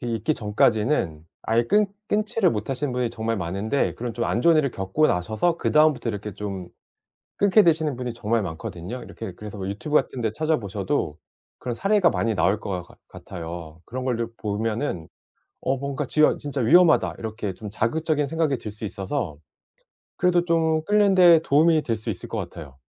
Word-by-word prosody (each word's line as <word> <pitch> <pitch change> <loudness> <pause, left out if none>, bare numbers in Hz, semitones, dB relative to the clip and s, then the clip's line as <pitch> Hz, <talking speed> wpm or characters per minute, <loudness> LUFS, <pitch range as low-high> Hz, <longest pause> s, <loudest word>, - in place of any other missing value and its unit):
있기 120 +4 -1
전까지는 105 - +1 0.2
아예 115 +1 +2
끊 210 - +3 0.2
끊지를 210 -2 +2
못하시는 130 +6 -2
분이 125 -2 0
정말 115 0 -2
많은데 100 +8 -1
그런 120 -1 -5
좀 120 - -1
안 115 - 0
좋은 165 +3 +5
일을 140 -4 +2
겪고 95 +12 +1
나셔서 110 - 0
그다음부터 155 -5 +3
이렇게 105 -1 -4
좀 95 -3 -6 0.7
끊게 205 +1 +5
되시는 160 -6 +2
분이 125 -1 -4
정말 115 -1 0
많거든요. 90 +6 -6
이렇게 110 -5 -8
그래서 105 +1 -9
뭐 95 - -5
유튜브 105 +10 -4
같은 130 - 0
데 110 - 0
찾아보셔도 110 - -1 0.4
그런 120 -2 -4
사례가 195 - +3
많이 115 -1 0
나올 95 +4 +2
것 95 -3 -4
같 85 - -19
같아요. 85 -2 -8
그런 130 +2 -5
거를 120 -3 -1
보면은 105 - -2 0.5
'어 135 +1 0
뭔가 140 +2 -3
지어 155 +4 +3
진짜 145 -2 -5
위험하다.' 165 +8 +5
이렇게 110 -3 -4
좀 105 +3 -8
자극적인 145 +7 0
생각이 160 -3 0
들 110 - -7
수 105 +2 -12
있어서 100 - -3 0.8
그래도 175 -1 +3
좀 160 -2 +1
끊는 205 -1 +3
데 175 -3 +7
도움이 155 +3 +4
될 115 -6 -2
수 110 +2 -4
있을 95 - -6
것 - - -4
같아요. 80 -7 -8
115 Hz, 370 characters per minute, -24 LUFS, 105-155 Hz, 0.8 s, 데